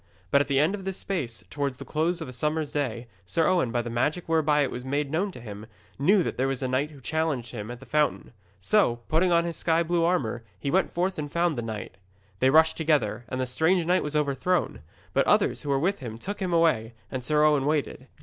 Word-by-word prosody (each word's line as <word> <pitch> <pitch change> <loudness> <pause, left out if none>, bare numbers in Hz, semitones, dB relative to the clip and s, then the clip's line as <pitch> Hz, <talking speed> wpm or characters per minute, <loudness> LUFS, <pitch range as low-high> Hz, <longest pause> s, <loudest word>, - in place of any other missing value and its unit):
But 140 - +5
at - - -1
the 140 - +1
end 155 +6 +3
of 200 -2 -5
this 190 0 -4
space, 130 - -4
towards 140 -3 -2
the - - -9
close 165 +3 0
of 160 - -5
a 125 - -8
summer's 150 +4 -1
day, 125 -5 -2 0.2
Sir 95 - 0
Owen, 170 -10 +2
by 120 0 0
the 120 - -5
magic 150 +9 -1
whereby 155 -2 +3
it 135 - -2
was 125 - -6
made 140 +2 -2
known 190 +6 0
to 125 - -11
him, 105 -2 -9 0.3
knew 185 +6 +4
that - - -4
there 130 +2 +1
was 135 0 -2
a - - 0
knight 130 +4 0
who 145 -3 -14
challenged 145 -4 -2
him 110 -2 -6
at 120 0 -7
the - - -13
fountain. 150 -4 0 0.3
So, 120 - +2
putting 175 +3 +3
on 170 0 +3
his 170 -2 -3
sky 165 0 +2
blue 170 0 +1
armour, 130 -10 0 0.2
he 140 - -2
went 190 +1 +2
forth 180 0 -1
and 145 -1 -4
found 170 -1 +1
the 120 - -2
knight. 110 -5 -6 0.4
They 130 - +4
rushed 160 +3 +5
together, 140 -8 +1
and 130 - -3
the 130 - 0
strange 160 +7 +2
knight 180 +2 +3
was 150 0 -4
overthrown. 150 +5 0 0.3
But - - +2
others - - +3
who 145 - -6
were 140 - +3
with 190 +8 0
him 115 -4 -7
took 200 - -5
him 185 -3 -2
away, 155 -10 +2 0.2
and 130 -1 -4
Sir 150 +4 +2
Owen 145 -2 +3
waited. 145 -3 -1
150 Hz, 245 wpm, -26 LUFS, 125-165 Hz, 0.4 s, But